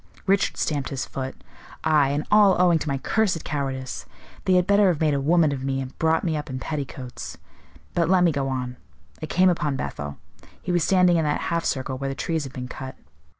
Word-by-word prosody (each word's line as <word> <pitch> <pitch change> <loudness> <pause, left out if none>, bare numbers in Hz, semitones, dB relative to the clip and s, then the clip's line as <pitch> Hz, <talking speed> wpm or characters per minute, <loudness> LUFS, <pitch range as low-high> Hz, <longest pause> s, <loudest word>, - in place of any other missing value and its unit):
Richard 195 0 +2
stamped 145 -3 -1
his 135 -2 -3
foot. 130 -1 -5 0.5
"Aye; 150 -3 +4
and 145 +2 -1
all 205 -3 +6
owing 175 -2 +4
to 155 - -5
my 140 - 0
cursed 180 +2 0
cowardice. 135 -3 -3 0.4
They 185 - +3
had 180 -1 +4
better 200 +1 +4
have 170 -5 +1
made 155 -2 +2
a 140 - 0
woman 160 +1 +4
of 135 -2 -4
me, 135 0 -1
and 130 -1 -6
brought 160 0 +2
me 165 -3 0
up 150 0 -4
in 130 - -4
petticoats. 135 -3 -6 0.6
But 170 -1 +1
let 185 -1 +5
me 170 - +4
go 140 -2 -1
on. 125 -1 -3 0.4
I 155 - -4
came 185 +4 +4
upon 150 -5 -1
Bethel. 75 - -5 0.4
He 180 - -4
was 175 -2 +2
standing 180 -1 +4
in 165 - +2
that 150 - +1
half 170 0 0
circle 130 -1 -2
where 135 0 -2
the 135 - -4
trees 160 0 -2
have 135 - -9
been 125 -1 -5
cut. 130 +1 -7
150 Hz, 220 wpm, -24 LUFS, 135-175 Hz, 0.6 s, all